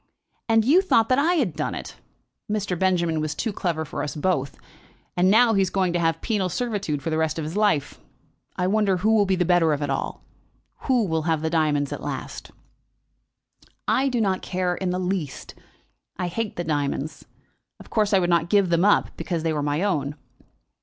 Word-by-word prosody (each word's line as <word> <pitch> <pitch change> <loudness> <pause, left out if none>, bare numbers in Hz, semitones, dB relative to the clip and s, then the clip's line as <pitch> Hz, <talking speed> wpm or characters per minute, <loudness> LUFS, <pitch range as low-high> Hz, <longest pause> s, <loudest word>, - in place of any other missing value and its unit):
And 225 -1 +4
you 320 +9 +5
thought 230 - +2
that 255 +1 +3
I 335 +5 +3
had 225 - 0
done 150 - -2
it! - - -8 0.5
Mr. 205 -3 -1
Benjamin 170 -4 +1
was 155 -1 -3
too 225 -3 -2
clever 165 -4 -2
for - - -5
us 150 - -4
both, 150 -4 -1 0.6
and 180 +1 +3
now 225 +3 +5
he 195 - +3
is 190 - +1
going 185 -3 0
to 175 - +1
have 165 -1 0
penal 205 -5 0
servitude 200 - -2
for 165 - -2
the 160 - 0
rest 160 0 0
of 160 - -3
his 160 +4 -5
life. 205 -9 +1 0.6
I 180 - -1
wonder 200 -1 +2
who 215 +5 +2
will 205 -2 +3
be 190 - +2
the 180 -1 +1
better 170 -3 +3
of 145 0 -2
it 145 - -2
all. 135 - -3 0.6
Who'll 210 - +2
have 160 -1 +1
the 160 - -1
diamonds 150 -4 +1
at - - -6
last?" - - -6 1.4
"I 270 +1 +2
do 245 -2 -1
not 195 -4 0
in 180 0 0
the 180 - -1
least 180 -6 -3
care. - - -25 0.6
I - - -2
hate 220 +4 -3
the 175 - -3
diamonds. 145 -1 -2 0.5
Of - - -15
course 215 -2 +1
I 195 - +5
would 180 -2 +1
not 170 0 +2
give 200 -2 +3
them 170 +1 +3
up, 205 - +3
because 170 -3 -3
they 165 -1 0
were 150 - -1
my 145 +4 -1
own." 150 -8 -1
180 Hz, 205 wpm, -24 LUFS, 160-205 Hz, 1.4 s, you